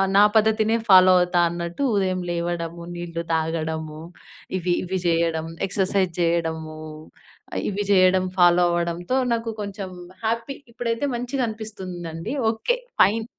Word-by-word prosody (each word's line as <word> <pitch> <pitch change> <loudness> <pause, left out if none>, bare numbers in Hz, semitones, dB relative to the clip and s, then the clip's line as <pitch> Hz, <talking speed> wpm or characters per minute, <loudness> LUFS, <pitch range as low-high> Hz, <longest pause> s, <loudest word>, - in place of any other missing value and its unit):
నా 205 - +8
పద్ధతినే 220 +1 +3
ఫాలో 185 -1 +8
అవుతా 180 0 +2
అన్నట్టు 170 +8 -4
ఉదయం 185 -2 +1
లేవడము, 170 0 -3
నీళ్లు 170 -1 -5
తాగడము 160 -1 -2 0.6
ఇవి 175 0 0
ఇవి 185 +1 -2
జేయడం 165 -1 +1 0.2
ఎక్సర్‌సైజ్ 190 -1 0
జేయడము, 160 -2 -1 0.9
ఇవి 205 0 -2
జేయడం 185 -1 +5
ఫాలో 175 0 +6
అవ్వడంతో 175 +7 -1 0.2
నాకు 230 0 -2
కొంచెం 200 -1 -5 0.4
హ్యాపీ. 230 +5 -1 0.2
ఇప్పుడైతే 235 +4 -1
మంచిగా 245 +1 -1
అనిపిస్తుందండి. 185 - -6 0.2
ఓకే. 485 - -1 0.2
ఫైన్. 220 +2 +3
180 Hz, 115 wpm, -23 LUFS, 170-215 Hz, 0.9 s, నా